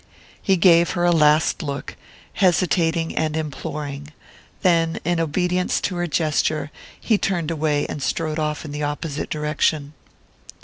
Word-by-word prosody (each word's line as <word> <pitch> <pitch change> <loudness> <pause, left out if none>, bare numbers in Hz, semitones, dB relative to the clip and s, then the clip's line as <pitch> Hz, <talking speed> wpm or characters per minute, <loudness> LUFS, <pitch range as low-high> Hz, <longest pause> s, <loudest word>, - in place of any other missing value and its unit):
He 190 -1 +2
gave 170 -1 +5
her 175 -1 0
a 175 - +4
last 155 -1 +3
look, 140 -2 -5 0.4
hesitating 170 -3 +1
and 155 0 0
imploring; 145 -1 -5 0.6
then, 165 -3 +2
in 175 0 +1
obedience 180 +3 0
to 185 - -2
her 175 0 -1
gesture, 155 -1 0 0.3
he 220 -3 +1
turned 170 -4 -1
away 150 -2 0
and 150 - -5
strode 155 +5 -1
off 150 0 -2
in 150 - -7
the 150 +1 -5
opposite 145 +1 -3
direction. 150 -1 -1
160 Hz, 140 wpm, -22 LUFS, 150-175 Hz, 0.6 s, gave